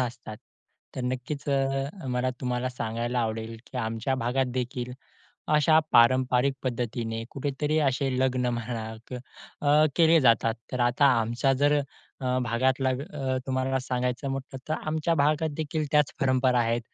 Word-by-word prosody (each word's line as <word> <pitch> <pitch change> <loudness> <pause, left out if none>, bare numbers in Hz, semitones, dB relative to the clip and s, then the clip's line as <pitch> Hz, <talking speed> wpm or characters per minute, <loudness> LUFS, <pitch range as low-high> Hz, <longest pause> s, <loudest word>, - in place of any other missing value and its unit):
असतात. 120 -3 -4 0.6
तर - - -2
नक्कीच 130 +3 -4
अ, 135 +4 -1
मला 125 +1 0
तुम्हाला 125 0 -1
सांगायला 120 0 -3
आवडेल 110 0 -3
की - - -10
आमच्या 115 +3 -1
भागात 130 +2 +1
देखील 125 0 -3 0.6
अशा 155 +1 +5
पारंपरिक 130 +2 +4
पद्धतीने 115 -2 -3
कुठेतरी 145 +2 -1
असे 135 +1 0
लग्न 130 -1 +1
म्हणा 115 -1 -4 0.7
अ, 150 +1 +4
केले 165 -1 +6
जातात. 115 -2 +3 0.2
तर 125 - -2
आता 120 +4 +3
आमचा 120 +4 +1
जर 145 +2 +3 0.5
अ, 130 0 0
भागातला 130 +3 +1
अ, 135 0 -3
तुम्हाला 130 0 0
सांगायचं 125 +1 -2
म्हटलं 135 0 -5
तर, 155 - +1
आमच्या 160 +2 0
भागात 150 +2 +2
देखील 155 0 -2
त्याच 150 -2 +3
परंपरा 130 -1 +3
आहेत. 115 0 +1
130 Hz, 140 wpm, -27 LUFS, 120-140 Hz, 0.7 s, केले